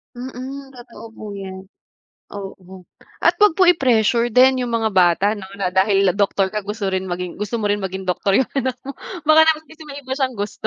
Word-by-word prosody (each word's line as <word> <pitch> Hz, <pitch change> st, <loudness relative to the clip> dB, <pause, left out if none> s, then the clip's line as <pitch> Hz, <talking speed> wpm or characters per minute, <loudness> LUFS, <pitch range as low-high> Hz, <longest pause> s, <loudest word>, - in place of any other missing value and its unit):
Mm, 265 Hz, +2 st, -8 dB
totoo 240 Hz, -3 st, -13 dB
po 220 Hz, -, -11 dB
'yan, 190 Hz, -1 st, -8 dB, 0.7 s
oo. 190 Hz, -2 st, -9 dB, 0.4 s
At -, -, +3 dB
huwag 415 Hz, -5 st, +5 dB
po 380 Hz, -, +2 dB
i-pressure 240 Hz, -, +3 dB
din 255 Hz, +3 st, +4 dB
'yung 245 Hz, -2 st, -2 dB
mga 225 Hz, -1 st, 0 dB
bata 185 Hz, 0 st, +3 dB
'no, 190 Hz, -, -9 dB
na 195 Hz, -2 st, -2 dB
dahil 195 Hz, +1 st, +2 dB, 0.2 s
doktor 195 Hz, -1 st, +1 dB
ka 210 Hz, -1 st, -5 dB
gusto 205 Hz, -2 st, -3 dB
rin 190 Hz, 0 st, -2 dB
maging 180 Hz, 0 st, -5 dB
gusto 210 Hz, +2 st, -3 dB
mo 205 Hz, -, 0 dB
rin 205 Hz, -, +1 dB
maging 190 Hz, -1 st, -5 dB
doktor 190 Hz, +1 st, -1 dB
'yung 260 Hz, -, +2 dB
anak 260 Hz, -1 st, -1 dB
mo, 275 Hz, -, -7 dB, 0.3 s
baka 310 Hz, +1 st, +5 dB
naman 315 Hz, -1 st, +2 dB
kasi 320 Hz, 0 st, -13 dB
may 285 Hz, -1 st, -9 dB
iba 260 Hz, 0 st, -6 dB
siyang 260 Hz, -2 st, -1 dB
gusto. 205 Hz, -1 st, -5 dB
215 Hz, 205 wpm, -20 LUFS, 190-260 Hz, 0.7 s, huwag